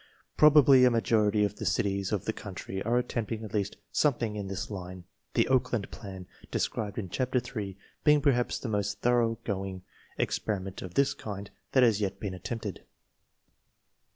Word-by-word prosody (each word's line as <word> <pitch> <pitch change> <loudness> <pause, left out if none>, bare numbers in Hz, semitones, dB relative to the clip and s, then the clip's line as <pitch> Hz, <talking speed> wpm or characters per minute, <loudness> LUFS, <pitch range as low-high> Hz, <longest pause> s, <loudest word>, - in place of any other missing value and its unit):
Probably 145 -4 +7
a 125 - +7
majority 110 -3 +2
of 100 - -4
the - - -5
cities 100 -1 0
of 105 -2 -1
the 110 - 0
country 95 -2 -6
are 120 +4 +1
attempting 115 -2 -2
at 110 - -8
least 105 -1 -1
some 145 -4 +3
thing 110 -3 -3
in 100 -2 -4
this 95 +2 -4
line 90 -2 -7 0.2
— - - -47
the - - +4
Oakland 125 -5 +1
plan, 95 -3 -8
( - - -20
described 105 -2 -2
in 105 -4 -3
Chapter 125 +6 0
3^/being 115 +5 0
perhaps 130 -4 +2
the - - -5
most 105 -1 -1
thoroughgoing 115 -6 0 0.3
ex - - 0
periment 95 -3 -3
of 90 -2 -8
the 140 - +5
kind 100 -2 -6 0.2
that 130 - +6
has 110 -4 +4
yet 100 -1 -2
been 100 -2 -4
attempted. 105 +1 -5
105 Hz, 175 wpm, -29 LUFS, 100-120 Hz, 0.3 s, Probably